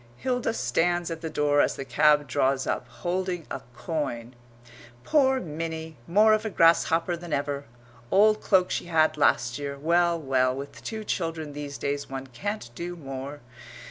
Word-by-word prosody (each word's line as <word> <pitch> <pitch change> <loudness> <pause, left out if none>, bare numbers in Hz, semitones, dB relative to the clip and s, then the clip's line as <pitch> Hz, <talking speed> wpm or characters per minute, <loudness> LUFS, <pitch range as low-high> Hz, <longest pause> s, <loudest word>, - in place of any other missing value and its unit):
Hilda 250 - -1
stands 175 -2 0
at 165 -1 -5
the 160 - -4
door 145 -1 +2
as - - +1
the 135 - -6
cab 150 +1 +4
draws 130 +1 +1
up, - - -2
holding 180 -1 -3
a 135 - -4
coin. 125 -4 -3 0.7
"Poor 265 -3 +3
Minnie, 160 -2 -5
more 210 +5 +5
of 215 - +1
a 220 - -2
grasshopper 165 -1 +3
than 170 -1 -9
ever 140 0 -2 0.4
old 215 +2 +4
cloak 185 -3 +3
she - - -2
had 160 -2 +3
last 120 -4 +2
year. 140 -1 -4
Well, 170 +3 +2
well, 130 -3 +1
with 140 +1 -8
two 220 -1 -5
children 165 -6 -3
these 145 -1 -6
days 140 0 -3
one 135 0 -5
can't 135 - -5
do 175 +6 -5
more. 140 -1 -7
160 Hz, 165 wpm, -26 LUFS, 140-175 Hz, 0.7 s, more